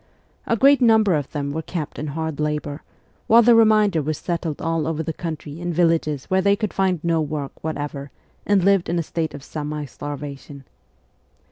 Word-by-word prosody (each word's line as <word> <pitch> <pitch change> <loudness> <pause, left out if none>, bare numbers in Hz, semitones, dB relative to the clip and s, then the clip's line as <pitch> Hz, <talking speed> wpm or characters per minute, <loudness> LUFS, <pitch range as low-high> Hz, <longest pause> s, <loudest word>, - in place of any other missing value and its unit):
A 230 - +1
great 275 +3 +5
number 220 -5 +5
of 145 -4 -2
them 140 -2 -3
were 160 +3 -3
kept 160 -2 -5
in 150 - -4
hard 160 0 -4
labour, 150 0 -2 0.5
while 235 +1 +7
the 240 +1 +6
remainder 215 -6 +4
were 155 +2 -1
settled 170 -3 -3
all 165 -1 -1
over 160 0 -2
the 160 - -3
country 155 -2 -6
in 175 0 -3
villages 165 -4 +1
where 190 0 +1
they 200 +1 +3
could 215 -1 -3
find 190 -3 +1
no 165 -1 +1
work 150 -2 -3
whatever 145 -2 -4 0.3
and 200 -3 +2
lived 195 -2 +3
in 170 - 0
a 170 - 0
state 160 -2 -3
of 140 - -10
semi 150 0 -5
starvation. 145 0 -8
160 Hz, 190 wpm, -22 LUFS, 150-185 Hz, 0.5 s, while